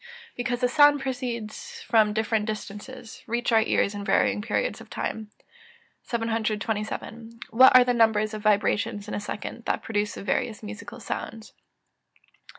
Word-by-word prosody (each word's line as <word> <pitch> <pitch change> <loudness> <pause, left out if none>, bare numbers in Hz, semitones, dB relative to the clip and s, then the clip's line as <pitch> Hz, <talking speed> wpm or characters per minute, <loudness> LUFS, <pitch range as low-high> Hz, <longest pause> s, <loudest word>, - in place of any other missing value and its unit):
_ - - -25 0.3
Because 245 0 -2
the 250 - +4
sounds 290 +1 +5
proceeding 245 -4 -3
from 215 0 0
different 220 0 0
distances, 220 +3 -7
reach 240 +2 -1
our 225 -1 +5
ears 210 -2 +1
in 205 0 -5
varying 200 +1 +2
periods 245 - -2
of - - -14
time. 220 -1 -4 0.7
727. 225 0 -3
_What 255 +4 +8
are 255 - +9
the 245 0 +1
numbers 220 -2 +3
of 215 - -5
vibrations 210 0 +1
in - - -6
a - - -1
second 210 +3 -6
that - - -1
produce 210 -1 -2
the - - -7
various 220 +1 -2
musical 225 +3 -8
sounds? 225 +1 -6
225 Hz, 155 wpm, -26 LUFS, 210-240 Hz, 0.7 s, are